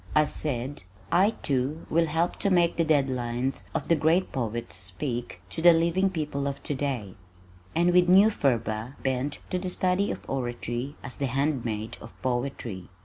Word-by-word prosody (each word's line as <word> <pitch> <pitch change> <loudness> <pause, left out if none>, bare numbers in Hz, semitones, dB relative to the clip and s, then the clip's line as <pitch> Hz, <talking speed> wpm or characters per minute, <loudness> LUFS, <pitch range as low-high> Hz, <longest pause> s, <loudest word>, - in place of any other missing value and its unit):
I 155 0 +6
said, 140 -2 -2 0.3
"I, 190 +4 +5
too, 140 +3 -1
will 165 +1 +3
help 165 +3 0
to 200 - +1
make 175 -2 +3
the 165 - +2
dead 150 -4 +3
lines 125 +1 -2
of - - -1
the 165 - +4
great 165 +4 +2
poets 120 -3 -3
speak 100 +3 -3
to - - -4
the 175 0 +8
living 170 +4 +2
people 150 -5 -2
of 140 0 -4
today," 130 -9 -2 0.6
and 175 +2 +4
with 180 0 +5
new 195 +4 +7
fervor 115 - -1
bent 135 +2 -1
to 180 - 0
the 185 0 -3
study 185 +2 +1
of - - -5
oratory 120 +1 -3
as 130 - -6
the 140 - 0
handmaid 120 -5 -1
of 110 - -12
poetry. 120 -7 -3
140 Hz, 170 wpm, -27 LUFS, 120-165 Hz, 0.6 s, the